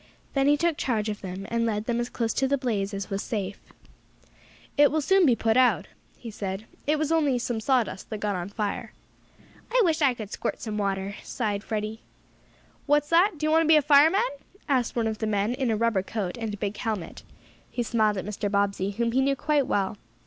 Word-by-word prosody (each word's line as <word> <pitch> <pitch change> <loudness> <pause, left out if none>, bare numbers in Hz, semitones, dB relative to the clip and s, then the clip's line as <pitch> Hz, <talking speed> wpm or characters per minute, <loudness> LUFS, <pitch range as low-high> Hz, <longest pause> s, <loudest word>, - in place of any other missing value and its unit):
Then 275 0 +2
he 290 +1 +5
took 335 0 +1
charge 220 -4 -1
of 210 - -5
them, 190 +1 -6
and 230 0 +1
led 215 -2 -1
them 240 0 0
as 240 0 -2
close 230 -2 -1
to 270 - +1
the 280 +1 +1
blaze 215 -7 -1
as 200 -1 -5
was 195 0 -1
safe. 200 -3 -4 1.2
"It 290 0 +6
will 315 - 0
soon 375 +3 +4
be 240 -3 +4 0.2
out," 255 -1 +3 0.3
he 230 - -8
said. 195 0 -5 0.2
"It 305 +1 +3
was 310 +1 -1
only 295 -6 +2
some 240 -1 -2
sawdust 235 -4 0
that 215 - -4
got 205 -1 -1
on 180 +1 -4
fire." 205 0 -3 0.8
"I - - +3
wish 325 -2 +1
I 270 -4 +4
could 215 -3 -8
squirt - - -3
some 215 -2 -4
water!" 195 0 -1
sighed 210 -4 -3
Freddie. 215 0 -3 0.9
"What's 295 0 +3
that? 345 +2 +4
Do 305 - -2
you 310 - +2
want 320 +1 +5
to 325 - +1
be 320 - +7
a - - +5
fireman?" 305 +8 +6 0.5
asked 255 -5 +1
one 230 -2 +1
of 220 -1 -2
the 220 - -1
men 205 +2 0
in 255 -1 -1
a 220 - +1
rubber 230 -3 +2
coat 195 -2 -4
and 225 -2 -4
a 205 - -5
big 205 0 -3
helmet. 215 -7 -4 0.5
He 240 - -2
smiled 215 -3 +1
at 185 - -4
Mr. 205 0 -3
Bobbsey, 200 -1 0
whom 235 0 +1
he 260 +3 +2
knew 275 +1 +2
quite 290 -1 +1
well. 200 -4 0
230 Hz, 220 wpm, -26 LUFS, 205-275 Hz, 1.2 s, be